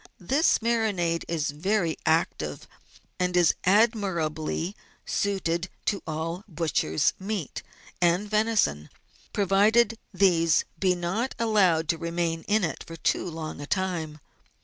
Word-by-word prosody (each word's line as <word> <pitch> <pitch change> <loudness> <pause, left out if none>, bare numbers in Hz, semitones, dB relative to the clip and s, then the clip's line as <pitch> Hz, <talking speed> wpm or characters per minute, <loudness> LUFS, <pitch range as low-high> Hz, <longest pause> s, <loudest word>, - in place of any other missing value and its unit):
This 275 - +3
marinade 205 -8 0
is 160 -3 -1
very 170 +2 0
active, 160 - 0 0.5
and 180 0 +1
is 175 -2 +5
admirably 185 -5 +1 0.3
suited 185 -3 -1 0.2
to 200 - 0
all 165 +4 -3
butcher's 155 - 0
meat 195 -5 -4 0.4
and 175 +4 +2
venison, 210 - +1 0.4
provided 210 +4 +3
these 175 -4 +3
be 185 -2 +2
not 190 +9 -2
allowed 190 -8 +3
to 165 - +1
remain 170 -1 -2
in 210 0 +2
it 160 -5 -3
for 165 - -8
too 165 +2 0
long 160 -2 -6
a 145 - -7
time. 175 -5 -2
175 Hz, 120 wpm, -26 LUFS, 165-205 Hz, 0.5 s, is